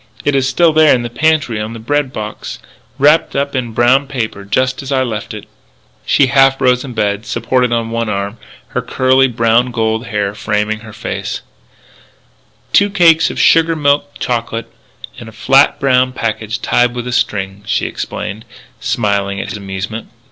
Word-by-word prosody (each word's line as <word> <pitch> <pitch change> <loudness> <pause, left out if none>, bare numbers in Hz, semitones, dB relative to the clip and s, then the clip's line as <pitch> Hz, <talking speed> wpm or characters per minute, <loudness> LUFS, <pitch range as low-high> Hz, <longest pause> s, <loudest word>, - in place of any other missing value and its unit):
It 145 - +2
is 135 -1 +1
still 170 -2 +3
there 155 -2 +5
in 120 - -2
the 120 - -5
pantry 150 -6 +1
on 110 +1 -5
the - - -7
bread 145 +3 -1
box, 105 -3 -6 0.4
wrapped 150 +4 +3
up 140 +1 -1
in 120 -3 -2
brown 125 +5 +3
paper, 115 -7 -4
just 130 +5 0
as 135 0 -7
I 130 -1 +2
left 110 -4 -4
it - - -8 0.3
" - - -37
She 140 - +4
half 135 +1 +3
rose 125 -2 +2
in 130 -3 -7
bed, 105 +1 -1
supported 120 +2 0
on 115 -1 -1
one 115 -1 -2
arm, 100 +2 -3 0.3
her - - -2
curly 130 +1 +2
brown 115 +1 +2
gold 110 0 -1
hair 100 -2 -2
framing 105 +1 -1
her 110 -1 -12
face: 110 - -5 0.6
" - - -36
Two 200 0 +4
cakes 170 -5 +4
of - - -6
sugar 165 0 +4
milk 145 -1 +1
chocolate 115 -2 -3 0.5
in 115 - -10
a - - -10
flat 135 +5 +3
brown 130 -2 +2
packet 110 -2 -3
tied 120 0 +2
with 120 0 -4
a - - -3
string," 100 -4 -1
she - - 0
explained, 110 +3 -5 0.4
smiling 100 -3 -1
at - - -5
his - - -5
amusement. 100 +3 -6
120 Hz, 180 wpm, -15 LUFS, 110-135 Hz, 0.6 s, there